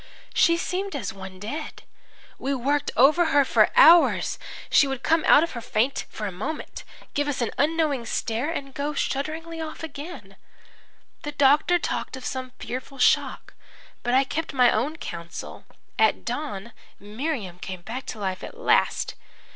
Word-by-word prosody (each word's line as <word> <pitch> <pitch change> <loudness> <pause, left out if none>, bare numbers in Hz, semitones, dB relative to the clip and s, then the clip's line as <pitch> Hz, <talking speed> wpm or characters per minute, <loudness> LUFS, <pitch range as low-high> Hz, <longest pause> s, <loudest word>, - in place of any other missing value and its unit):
She 335 0 +4
seemed 380 +2 -3
as 220 -9 -4
one 190 -1 -10
dead. 290 +10 -6 0.6
We 275 +1 -1
worked 280 +3 0
over 305 +8 +6
her 285 -3 +4
for - - +4
hours. 345 -9 +6 0.3
She 280 - +6
would 270 -1 -4
come 325 0 +3
out 300 - +7
of 335 - -3
her 235 - -6
faint 235 +5 -1
for 215 - -6
a 200 - -3
moment, 220 - -6 0.3
give 290 -1 0
us 290 - -2
an 235 - -1
unknowing 295 -5 +1
stare 235 +6 -1
and 275 -5 -5
go 290 +2 -3
shudderingly 320 +5 -3
off 315 0 -7
again. 280 - -8 0.8
"The 295 -2 -5
doctor 290 +5 +4
talked 325 - -3
of 255 - -9
some 255 -1 -4
fearful 260 +2 -6
shock, 250 - +2 0.5
but 245 +1 0
I 265 - +5
kept 305 +4 -4
my 250 -2 +6
own 275 +8 0
counsel. 170 - -8 0.3
At 220 -1 +3
dawn 235 -4 -4 0.3
Miriam 210 - -4
came 185 -1 -6
back 245 +7 -6
to - - -5
life 190 -2 -3
at 475 - -8
last. - - +2
275 Hz, 165 wpm, -25 LUFS, 225-310 Hz, 0.8 s, out